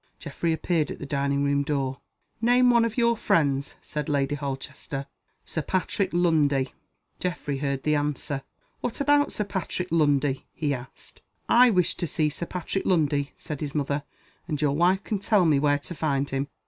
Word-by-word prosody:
Geoffrey 170 - -2
appeared 160 -1 0
at - - -5
the - - -7
dining 140 0 0
room 140 0 +2
door. 140 -2 -2 0.4
"Name 245 +1 +5
one 235 -1 +5
of 230 0 -2
your 235 -1 +4
friends," 140 -9 +1
said 150 -1 -4
Lady 140 -1 +1
Holchester. 140 0 -5 0.4
"Sir 160 - -3
Patrick 185 +4 -1
Lundie." 150 -6 +2 0.5
Geoffrey 150 -6 -2
heard 140 -1 -2
the 150 - +2
answer. 145 -1 -1 0.4
"What 245 - -3
about 290 +1 +3
Sir 210 - -1
Patrick 190 -2 -3
Lundie?" 145 -4 +2
he 145 -3 -1
asked. 130 0 -9 0.3
"I 250 +1 +7
wish 180 -6 +2
to 170 - -2
see 150 +1 +1
Sir 165 +3 -5
Patrick 185 +2 -3
Lundie," 145 -5 +1
said 150 -2 -6
his 150 -1 -4
mother. 145 0 0 0.5
"And 150 -4 -2
your 145 -2 +1
wife 180 +5 +3
can 210 -3 -2
tell 200 -2 +3
me 150 -4 +4
where 145 0 +3
to 145 +4 -8
find 140 -3 0
him." 135 +1 -1
150 Hz, 175 wpm, -26 LUFS, 140-180 Hz, 0.5 s, I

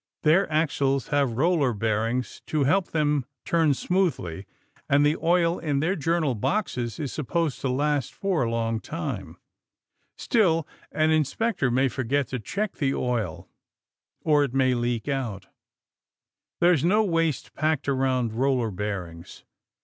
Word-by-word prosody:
Their 160 +3 +3
axles 140 -4 +1
have 140 -5 +1
roller 150 -4 +2
bearings 115 +3 -1
to 155 -2 +1
help 175 +7 +2
them 150 -3 +1 0.2
turn 160 -4 +2
smoothly, 130 - -1 0.4
and 145 +1 +4
the 150 +1 +3
oil 170 0 +2
in 145 -4 -1
their 170 +6 +1
journal 160 -3 0
boxes 120 - -2
is 145 -4 -4
supposed 160 0 -2
to 135 - -1
last 145 0 0
for 195 -6 -1
a 120 - +1
long 115 -1 -1
time. - - -5 0.8
Still, 165 -9 +2 0.2
an 155 0 +2
inspector 155 - +1
may 130 +3 +2
forget 130 +2 -1
to 130 - -3
check 200 - -3
the 135 -3 0
oil, 115 -10 -2 0.7
or 150 -2 +3
it 135 -2 -3
may 130 -1 +3
leak 120 -1 -1
out. 120 -9 -3 1.1
There's 175 -4 +4
no 210 +6 +4
waste 165 -6 -1
packed 155 -2 0
around 130 -4 +1
roller 125 -2 +1
bearings. 90 -4 -6
140 Hz, 140 wpm, -25 LUFS, 120-160 Hz, 1.1 s, and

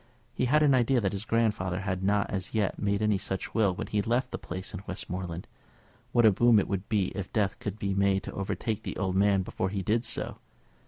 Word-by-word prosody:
He - - 0
had 150 +5 +4
an 145 -2 +5
idea 125 0 +3
that 100 -4 0
his 100 +1 -4
grandfather 105 -6 0
had 95 -2 -2
not 100 +1 +2
as 95 +2 -4
yet 105 -3 0
made 100 +1 0
any 105 -2 +2
such 95 -1 -4
will 100 -5 +2
when - - -4
he 105 - 0
left 120 +4 0
the - - -4
place 95 +4 -6
in 100 - -5
Westmoreland. 90 -1 -4 0.7
What 120 -2 +4
a 110 - +8
boon 115 +3 +5
it 100 - +2
would 100 0 -3
be 105 -5 +1
if 95 -1 -6
death 100 -3 0
could 105 0 -4
be 100 -2 -1
made 100 0 +2
to - - -6
overtake 105 +2 -2
the - - -5
old 95 -1 -1
man 100 -1 +3
before 95 +1 -2
he 100 -1 -3
did 115 +4 +1
so! - - -2
100 Hz, 230 wpm, -29 LUFS, 95-110 Hz, 0.7 s, a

